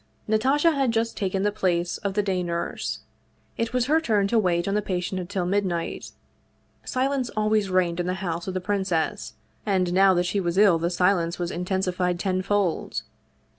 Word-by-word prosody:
Natasha 270 +9 +3
had 275 -4 +1
just 230 0 -1
taken 195 -1 -1
the 205 - +2
place 180 -4 -1
of 200 -2 -3
the 210 - +2
day 190 -2 0
nurse. 170 -1 -3 0.5
It 230 0 -2
was 250 -1 +1
her 310 +4 +3
turn 210 -9 +2
to 230 - +3
wait 175 -3 +1
on 195 - 0
the 210 - +1
patient 185 -1 -2
until 180 +1 -3
midnight. 180 -3 -1 0.7
Silence 260 -1 -1
always 215 -1 +2
reigned 180 -2 +1
in 175 - -1
the 185 - -1
house 175 -3 -4
of 190 - -3
the 185 - -1
princess, 190 -1 -1 0.3
and 185 -4 +1
now 190 0 +5
that 175 0 +1
she 200 +3 0
was 175 -1 -1
ill 195 -5 +5
the 170 +1 0
silence 180 -1 +1
was 175 -1 -3
intensified 180 0 -1
tenfold. 190 0 -1
190 Hz, 180 wpm, -25 LUFS, 180-210 Hz, 0.7 s, now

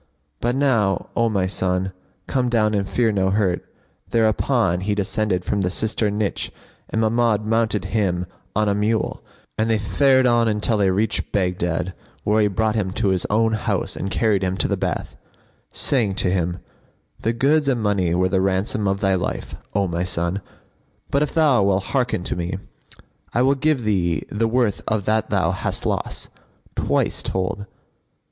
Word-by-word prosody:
But 120 +1 0
now, 115 -9 +1
O 115 -1 +2
my 100 -4 +1
son, 95 0 -1 0.3
come 125 -2 0
down 110 -3 +2
and 100 -2 -1
fear 115 -2 +2
no 95 -2 +1
hurt." 95 -3 +1 0.5
Thereupon 110 -3 +2
he 105 +2 0
descended 100 -2 -1
from 100 - 0
the 90 - +1
cistern 105 +1 0
niche 105 -2 -2 0.4
and 110 - -1
Mahmud 110 -1 +2
mounted 110 -3 +1
him 90 -5 +1 0.3
on 110 0 +2
a 100 - +2
mule, 105 +2 0 0.4
and 110 +1 +1
they 110 - +3
fared 130 +5 +3
on 115 -3 +3
till 110 +1 +1
they 100 -2 +3
reached 105 +4 0
Baghdad, 90 -2 -1 0.3
where 105 +1 +3
he 105 - +4
brought 110 +2 0
him 105 -4 -1
to 105 -1 +1
his 95 -2 0
own 110 +1 +2
house 110 - -1
and 95 - -3
carried 105 -1 +1
him 95 0 -1
to - - +2
the - - 0
bath, - - -3 0.6
saying 110 -8 +2
to 90 - +1
him, 90 -1 -1 0.6
"The 115 - 0
goods 140 +5 +2
and 130 -3 +2
money 100 -5 +1
were 90 +1 +2
the 95 +1 +2
ransom 95 +3 0
of 100 0 0
thy 95 -1 +3
life, 90 -1 -2 0.2
O 100 -1 +2
my 85 0 -1
son; 85 +2 -1 0.7
but, 140 - +2
if 150 - 0
thou 150 -8 +4
wilt 95 -1 +2
hearken 125 -6 -1
to - - -2
me, 90 +1 -3 0.8
I 120 - +4
will 135 +1 +4
give 140 -2 +1
thee 90 -6 +1
the 115 +2 +1
worth 115 -3 +1
of 110 -3 0
that 110 +1 +1
thou 90 -5 +2
hast 95 - -2
lost, - - -2 0.5
twice - - 0
told." 95 +2 -2
105 Hz, 175 wpm, -22 LUFS, 95-115 Hz, 0.8 s, he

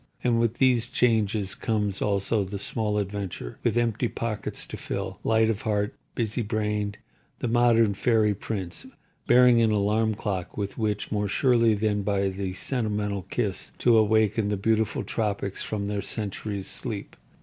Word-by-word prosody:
And 120 -2 +2
with 115 0 +1
these 125 -3 +3
changes 110 -5 +1
comes 105 -4 -1
also 100 +1 +1
the 100 +1 -5
small 105 +1 -1
adventurer, 100 -10 -4
with 120 -1 +1
empty 120 0 +1
pockets 115 -2 -3
to - - -7
fill, - - -5
light 110 0 +3
of 110 -2 -1
heart, 105 -4 0 0.2
busy 115 0 -1
brained—the 105 +1 -4
modern 115 -2 +4
fairy 110 0 +2
prince, 100 - -5 0.4
bearing 125 -1 +6
an 115 - +4
alarm 105 +1 +1
clock 95 -4 -4
with 100 -1 -3
which, 105 -2 -2
more 105 -1 0
surely 115 +1 +3
than 105 0 0
by 100 -1 +1
the 95 -1 -4
sentimental 105 -3 -2
kiss, - - -1
to 120 -2 +4
awaken 110 -1 +3
the 105 - 0
beautiful 110 +1 +1
tropics 100 -3 -2
from 105 -2 -3
their 100 0 -2
centuries' 100 -1 -4
sleep. 110 -6 -4
105 Hz, 150 wpm, -26 LUFS, 100-115 Hz, 0.4 s, bearing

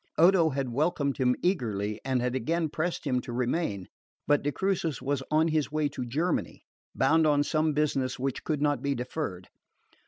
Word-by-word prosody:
Odo 170 0 +5
had 135 -2 -2
welcomed 140 +1 0
him 125 -2 +2
eagerly, 110 - -1
had 125 -2 0
again 160 +6 0
pressed 165 +3 -3
him 125 -3 +1
to 120 - -8
remain; 120 - -1 0.4
but 145 -1 +3
de 145 - -1
Crucis 170 -3 -1
was 140 0 -1
on 160 +2 +3
his 155 -2 0
way 155 -1 +1
to 125 - -5
Germany, 160 +8 -1 0.3
bound 155 +4 +4
on 145 -1 +3
some 155 +1 +1
business 135 -4 0
which 135 0 -3
could 150 -2 -1
not 145 -1 +1
be 140 0 0
deferred. 125 - -4
145 Hz, 175 wpm, -28 LUFS, 125-160 Hz, 0.4 s, Odo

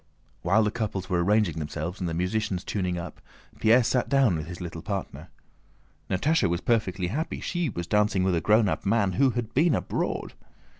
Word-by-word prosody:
While 100 +6 +3
the 105 - +1
couples 105 -5 -4
were 85 -1 +2
arranging 100 -4 +2
themselves 80 +5 -4
and 90 -3 -2
the 80 - -3
musicians 90 +1 -1
tuning 90 -3 -2
up, 85 - -7 0.4
Pierre 115 +3 +5
sat 125 +1 0
down 135 -9 +3
with 75 -1 -4
his 90 0 -8
little 85 -2 -6
partner. 90 -5 -5 0.8
Natásha 140 - +2
was 85 0 0
perfectly 100 -6 0
happy; 155 - -3
she 175 -4 -2
was 85 -6 -4
dancing 105 -1 +2
with 95 -1 +2
a 85 - +1
grown 105 0 +4
up - - -2
man, 100 -1 +2
who 135 +9 +3
had 120 -3 -3
been 160 +3 +3
abroad. - - -2
100 Hz, 190 wpm, -26 LUFS, 90-115 Hz, 0.8 s, Pierre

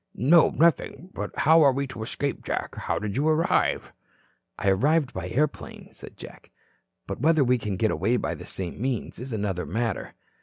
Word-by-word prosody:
"No, 155 - +5
nothing. 170 +3 +1
But - - -4
how 160 +1 +6
are 140 -3 +6
we 140 +2 -2
to 130 -4 -8
escape, 140 +5 -3
Jack? - - -3
How - - -3
did 105 -1 -4
you 145 +3 +1
arrive?" 160 +1 +1 0.7
"I 100 - +1
arrived 145 +9 +2
by 90 -1 -5
airplane," 145 +8 -2
said - - -13
Jack. - - -12 0.6
"But - - -6
whether 155 0 +4
we 125 -1 +2
can 105 -4 -3
get 110 +1 +1
away 115 +7 +1
by - - -2
the - - -10
same 95 +2 -6
means 130 -3 -3
is 125 +2 -7
another 100 -5 -2
matter." 115 +1 -3
125 Hz, 185 wpm, -25 LUFS, 105-150 Hz, 0.7 s, how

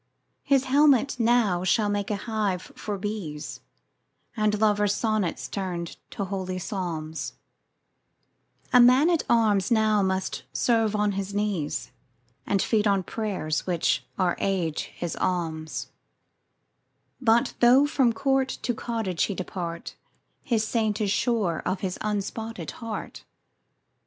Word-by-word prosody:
His 275 -2 +3
helmet 275 -1 +3
now 225 -6 +3
shall 210 +3 +2
make 205 -1 -1
a 210 - 0
hive 200 -3 -2
for 205 -1 -4
bees; 185 -7 -5 0.8
And, 215 -2 +1
lovers' 210 -1 +3
sonnets 215 -6 -1
turn'd 180 -4 -4
to 200 - -4
holy 185 -1 -3
psalms, 170 -5 -4 1.4
A 250 - +8
man 255 +7 +6
at 335 - +2
arms 210 -5 +3
must 205 -4 +1
now - - -35
serve 225 -3 +2
on 210 -1 +2
his 195 0 -4
knees, 200 -8 -2 0.6
And 200 -1 +2
feed 215 -2 +2
on 195 -2 +2
prayers, 185 -7 -2
which 175 -3 +1
are 180 -2 +2
Age 180 -6 -1
his 175 -2 -5
alms: 160 -3 -2 1.3
10 - - -13
But 235 +2 +3
though 250 +4 +6
from 270 -5 +2
court 270 +3 +1
to 245 - 0
cottage 220 -6 -1
he 200 - -4
depart, 175 -2 -5 0.5
His 220 -3 0
Saint 220 -3 0
is 205 -2 0
sure 215 -8 +1
of 185 0 -2
his 185 -2 -3
unspotted 215 +2 -3
heart. 225 -2 -6
205 Hz, 130 wpm, -26 LUFS, 185-230 Hz, 1.4 s, A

